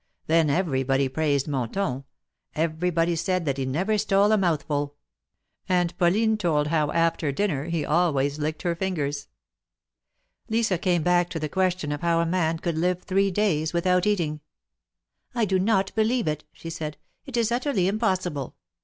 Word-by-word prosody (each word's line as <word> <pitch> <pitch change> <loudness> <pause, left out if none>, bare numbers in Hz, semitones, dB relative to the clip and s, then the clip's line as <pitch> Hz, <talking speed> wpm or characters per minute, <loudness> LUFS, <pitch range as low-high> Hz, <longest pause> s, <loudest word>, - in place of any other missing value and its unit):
Then 160 -1 +3
everybody 135 -5 +1
praised 145 0 0
Monton. 135 - -2 0.5
Everybody 165 +1 0
said 185 +1 -1
that 140 -2 -1
he 130 - -1
never 190 +11 0
stole 200 0 +3
a - - +5
mouthful. 150 -5 -1 0.7
And 180 -2 +1
Pauline 215 +5 +3
told 150 -6 +1
how 155 -2 +1
after 165 -2 +1
dinner 145 -3 -1
he 165 -3 -2
always 150 -3 +1
licked 155 +2 -3
her 170 -2 0
fingers. 150 -6 -2 1.2
Lisa 220 -5 +1
came 175 -3 +1
back 175 0 +3
to 165 - -4
the 155 - -2
question 185 -2 0
of 145 - -3
how 170 -1 +2
a 170 - +2
man 165 -1 0
could 165 -1 -2
live 180 +1 0
three 195 +1 +2
days 175 -6 0
without 180 +2 +2
eating. 165 -7 0 0.5
" - - -43
I 235 -2 +2
do 190 -2 +1
not 195 -1 +1
believe 225 -1 +1
it," 150 -1 -2
she 165 - -9
said. 155 -2 -5
" - - -48
It 255 -3 -4
is 230 -1 +1
utterly 245 -4 0
impos 195 -2 +1
sible. 140 -6 -5
170 Hz, 170 wpm, -25 LUFS, 150-190 Hz, 1.2 s, a